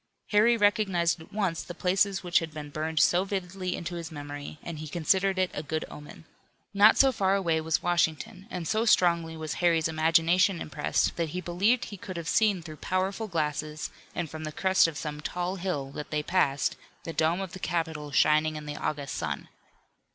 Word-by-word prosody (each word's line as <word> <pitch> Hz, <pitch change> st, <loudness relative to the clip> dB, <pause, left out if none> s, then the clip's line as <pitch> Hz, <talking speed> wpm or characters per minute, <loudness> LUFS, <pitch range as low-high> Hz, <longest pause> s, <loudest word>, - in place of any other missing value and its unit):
Harry 225 Hz, +3 st, +4 dB
recognized 190 Hz, -5 st, +2 dB
at 160 Hz, -, -14 dB
once 195 Hz, -6 st, -1 dB
the 175 Hz, -, -8 dB
places 190 Hz, +1 st, +1 dB
which 175 Hz, -1 st, +3 dB
had 165 Hz, -1 st, -6 dB
been 150 Hz, -1 st, -8 dB
burned 155 Hz, +1 st, -2 dB
so 175 Hz, +4 st, +4 dB
vividly 190 Hz, -2 st, -3 dB
into 175 Hz, +1 st, -5 dB
his 170 Hz, -1 st, -6 dB
memory, 145 Hz, -1 st, -7 dB
and 165 Hz, -3 st, -6 dB
he 155 Hz, -, -6 dB
considered 190 Hz, +4 st, +1 dB
it 185 Hz, -1 st, +1 dB
a -, -, -3 dB
good 155 Hz, +1 st, -3 dB
omen. 150 Hz, +2 st, -11 dB, 0.5 s
Not 205 Hz, +2 st, +6 dB
so 270 Hz, -1 st, +6 dB
far 195 Hz, -5 st, +1 dB
away 165 Hz, -5 st, +1 dB
was 160 Hz, +2 st, 0 dB
Washington, 175 Hz, +2 st, 0 dB
and 180 Hz, -6 st, -4 dB
so 220 Hz, +1 st, +1 dB
strongly 170 Hz, -6 st, +3 dB
was 155 Hz, -1 st, -4 dB
Harry's 165 Hz, -2 st, +3 dB
imagination 165 Hz, +3 st, +3 dB
impressed 150 Hz, -1 st, -1 dB
that 165 Hz, -2 st, -1 dB
he -, -, 0 dB
believed 185 Hz, +8 st, +1 dB
he 205 Hz, -, -8 dB
could 185 Hz, 0 st, -7 dB
have 165 Hz, -1 st, -5 dB
seen 205 Hz, -4 st, +2 dB
through 155 Hz, -2 st, -9 dB
powerful 190 Hz, +6 st, -1 dB
glasses 155 Hz, -3 st, -2 dB, 0.2 s
and 175 Hz, -, -2 dB
from 155 Hz, +1 st, -8 dB
the 155 Hz, -, -4 dB
crest 190 Hz, +2 st, +3 dB
of 160 Hz, -3 st, -5 dB
some 150 Hz, -1 st, -5 dB
tall 180 Hz, +4 st, -3 dB
hill 170 Hz, -7 st, -3 dB
that 150 Hz, +1 st, -7 dB
they 150 Hz, -1 st, -1 dB
passed, 145 Hz, -5 st, +1 dB, 0.3 s
the 165 Hz, -, -5 dB
dome 160 Hz, +3 st, +1 dB
of 190 Hz, -3 st, -4 dB
the 185 Hz, -, -8 dB
Capitol 160 Hz, -4 st, -2 dB
shining 155 Hz, +2 st, +3 dB
in 150 Hz, 0 st, -6 dB
the 150 Hz, 0 st, -5 dB
August 145 Hz, -2 st, -3 dB
sun. -, -, -4 dB
170 Hz, 195 wpm, -28 LUFS, 155-190 Hz, 0.5 s, Not